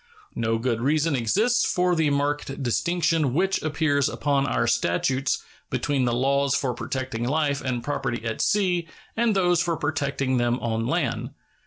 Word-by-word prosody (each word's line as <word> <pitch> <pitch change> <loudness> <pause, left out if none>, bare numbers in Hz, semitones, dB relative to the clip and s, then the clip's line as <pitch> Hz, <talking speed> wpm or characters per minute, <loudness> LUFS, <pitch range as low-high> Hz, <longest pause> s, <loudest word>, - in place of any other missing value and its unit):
No 115 0 0
good 115 -1 -1
reason 150 +3 +2
exists 210 - +2
for 180 0 +1
the 160 -2 +2
marked 145 -1 -1
distinction 160 +1 +1
which 190 +3 +1
appears 145 -2 +1
upon 140 -1 0
our 115 - +1
statutes 120 +4 0 0.3
between 140 -3 0
the 120 - +1
laws 140 +2 +2
for 130 -3 0
protecting 130 -2 -4
life 140 +2 0
and 125 -2 -2
property 120 -5 -3
at 115 -1 -2
sea 180 -5 +1 0.3
and 225 -2 +2
those 175 -3 +3
for 170 -1 -1
protecting 140 -3 -1
them 120 +1 +1
on 115 0 -2
land. - - -2
140 Hz, 155 wpm, -25 LUFS, 120-160 Hz, 0.3 s, those